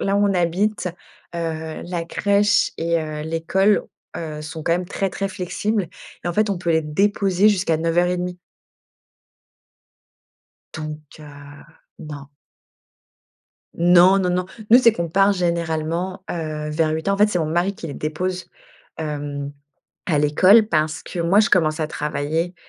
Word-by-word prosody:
là 195 0 +1
où 205 - +2
on 195 - +1
habite, 185 +4 0 0.5
heu, 160 -1 -4
la 175 -1 -3
crèche 205 +3 +2
et 170 +1 +1
heu, 155 -1 -5
l'école, 165 +6 +1 0.3
heu, 155 -2 -5
sont 155 +1 -7
quand 165 - +1
même 180 +1 -1
très 195 0 -2
très 195 +1 -3
flexibles 190 +1 -2 0.4
et - - -1
en 175 - -1
fait, 215 +1 +1
on 190 - -1
peut 170 -1 -2
les 160 0 +2
déposer 195 +4 +2
jusqu'à 185 -5 +1
9:30 175 +2 0 2.3
donc, 155 -1 -6 0.2
heu, 145 -1 -13 0.4
non. 145 -2 -9 1.5
Non, 175 +2 +6
non, 185 -2 0
non. 180 0 0 0.3
Nous, 245 - +9
c'est 235 -2 +6
qu'on 170 -6 -3
part 195 +3 +4
généralement, 170 0 -2
heu, 155 -2 -4
vers 155 +1 +1
8:00. 160 +5 -1
En - - -1
fait, 210 +1 +5
c'est 180 - 0
mon 160 - 0
mari 175 +5 0
qui 165 - -7
les 145 - -6
dépose, 180 +6 -3 0.5
hem, 145 -2 -4 0.5
à 160 -5 +1
l'école 185 +9 +5
parce 155 -3 0
que 175 - -6
moi, 170 +5 +3
je 215 - +3
commence 160 -3 +2
à 155 - -1
travailler, 155 +4 -2
170 Hz, 155 wpm, -21 LUFS, 155-190 Hz, 2.3 s, Nous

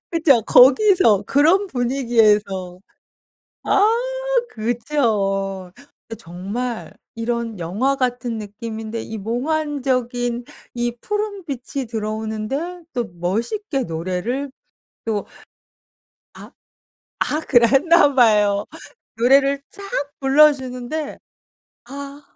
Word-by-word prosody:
그쵸. 310 -9 +3
거기서 260 - +5
그런 335 +8 +3
분위기에서 220 - +1 0.8
아 405 - +4 0.6
그죠. 210 -6 -1 0.4
그 225 - -7
정말 205 +8 -5 0.2
이런 230 -2 -3
영화 210 +12 0
같은 245 -3 -2
느낌인데 220 +1 -6
이 220 -1 -7
몽환적인 250 -1 -1 0.3
이 240 0 -2
푸른 415 - -3
빛이 270 -2 -5
들어오는데 220 +10 -4
또 240 -2 -1
멋있게 235 - -2
노래를 185 +12 -3 0.5
또 215 -3 -2 1.1
아. - - -12 0.7
아 305 - 0
그랬나 285 +5 +4
봐요. 210 -4 +4 0.5
노래를 275 +4 +4
쫙 400 - -12 0.4
불러주는데 275 0 +2 0.7
'아.' 280 +2 -8
240 Hz, 185 characters per minute, -21 LUFS, 215-280 Hz, 1.1 s, 거기서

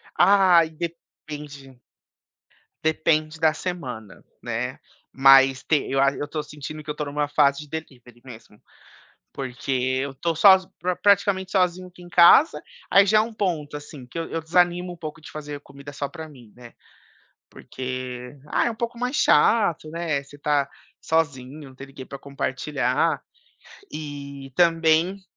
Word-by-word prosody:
Ai 185 -5 +5
depende 150 -4 -9 1.0
depende 155 0 0
da 160 -1 +3
semana, 130 - -6 0.2
né, 120 +2 -4 0.3
mas 135 -1 +5
te 150 -3 0
eu 135 - 0
a 140 0 +4
eu 145 - -5
tô 150 0 -4
sentindo 150 +1 -9
que 150 - -12
eu 150 - -1
estou 150 -1 -5
em 140 - -6
uma 145 0 -1
fase 140 -1 +2
de 150 - -11
delivery 125 -6 -9
mesmo, 115 -4 -14 0.7
porque 130 -1 -5 0.3
eu 140 0 -4
tô 165 +5 -2
só 190 +4 +7 0.5
praticamente 200 -2 +2
sozinho 185 -1 0
aqui 180 0 -17
em 175 - -12
casa, 175 - +6 0.3
aí, 200 0 +6
já 215 +2 +4
é - - +6
um 225 +1 -5
ponto, 165 -9 -2
assim, 145 -3 -9
que 145 - -10
eu 165 - -4
eu 165 - -3
desanimo 175 +2 +1
um - - -13
pouco 160 -1 -8
de - - -12
fazer 150 -1 -7
comida 140 0 -12
só 145 0 -4
para 160 +2 -9
mim, 120 -7 -16
né, 120 -1 -14 0.8
porque, 130 0 -7
ah, - - +1
é - - 0
um - - -9
pouco 235 +1 -4
mais 250 +3 -2
chato, 205 - +3
né, 160 -3 -2
você 145 +1 -15
tá 145 -1 0 0.3
sozinho, 145 -3 -2
não 130 - -17
tem 135 +1 -10
ninguém 135 -1 -11
para 140 - -9
compartilhar 140 +1 -1 0.7
e, 140 -2 -8
também 170 +2 +2
150 Hz, 160 wpm, -23 LUFS, 135-170 Hz, 1.0 s, só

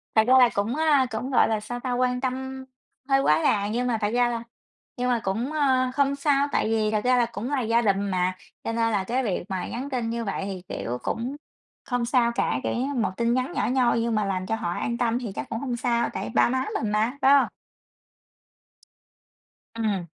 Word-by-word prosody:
Thật 220 - +6
ra 255 - +5
là 245 -2 +7
cũng, 205 +5 -1
à, 300 -4 +3
cũng, 250 +5 -4
gọi - - +4
là, 220 -1 0
sao 245 +3 -6
ta? 250 0 -3
Quan 250 0 0
tâm 265 0 -4 0.4
hơi 270 0 +4
quá 155 - +3
đà, 200 -1 +2
nhưng 245 +4 -1
mà 230 -2 +1
thật 205 - +1
ra 245 0 +3
là 235 -1 -3 0.5
nhưng 250 0 0
mà 240 -2 +2
cũng, 225 +9 -2
ờ, 260 -4 +2
không 280 0 +2
sao, 280 0 +2
tại - - +1
vì 215 -1 +1
thật 215 -1 +1
ra 250 0 +4
là 240 - +4
cũng 230 +2 -5
là 275 -3 +1
gia 230 +1 +2
đình 200 -3 +2
mà. 185 0 0 0.3
Cho 230 - -2
nên 230 0 +1
là 200 -3 +1
cái 250 +6 -1
việc 195 -6 -1
mà 190 -1 -3
nhắn 260 +4 -5
tin 245 -4 -2
như 235 0 -3
vậy 195 -1 -3
thì, 190 -2 -6
kiểu, 120 +1 -3
cũng 250 +5 -3 0.5
không 245 -2 -1
sao 235 -1 +2
cả, 125 - 0
kiểu, - - -1
như 265 +4 -1
một 225 -5 0
tin 235 0 +1
nhắn 255 +4 -1
nhỏ - - 0
nhoi, 245 -3 +2
nhưng 230 -1 0
mà 210 -1 +1
làm 185 -1 -2
cho 225 - -1
họ 225 -6 -3
an 235 +1 -2
tâm 240 0 +1
thì 230 -5 -5
chắc - - -5
cũng 225 - -3
hông 255 -3 -3
sao, 235 0 0
tại - - -4
ba - - +5
má 260 +1 0 0.2
mình 210 - -1
mà, 220 +6 0
phải 275 +1 +6
hông? 280 - +5 2.3
Ừm. 210 -6 -1
235 Hz, 235 wpm, -25 LUFS, 215-255 Hz, 2.3 s, là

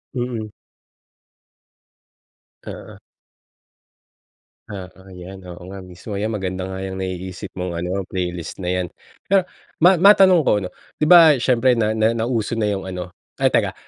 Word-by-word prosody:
Mm. 120 -4 -3 2.2
Oo. - - -9 1.7
Oo 95 -1 -10
'yan, 95 +1 -10
oo 85 0 -10
nga 95 - -8
mismo, 90 +3 -10
'yan 100 +2 -2
maganda 95 0 -4
nga 95 - -5
'yang 95 - -5
naiisip 95 -1 -5
mong 90 -2 -3
ano, 95 +2 -3
playlist 90 -1 -5
na 90 - -2
'yan. 90 -1 -1 0.5
Ah, 195 - +6 0.4
ma 180 +2 +6
matanong 185 -3 +6
ko - - +3
ano, 90 - -5 0.3
'di - - +4
ba 165 -4 +9
siyempre 125 0 +3
na 110 -1 0
na 110 +1 +3
nauso 115 -1 -1
na 110 -2 0
'yung 100 -2 -3
ano 90 -1 -6 0.3
ay - - +5
teka, - - +1
95 Hz, 145 wpm, -21 LUFS, 90-115 Hz, 2.2 s, ba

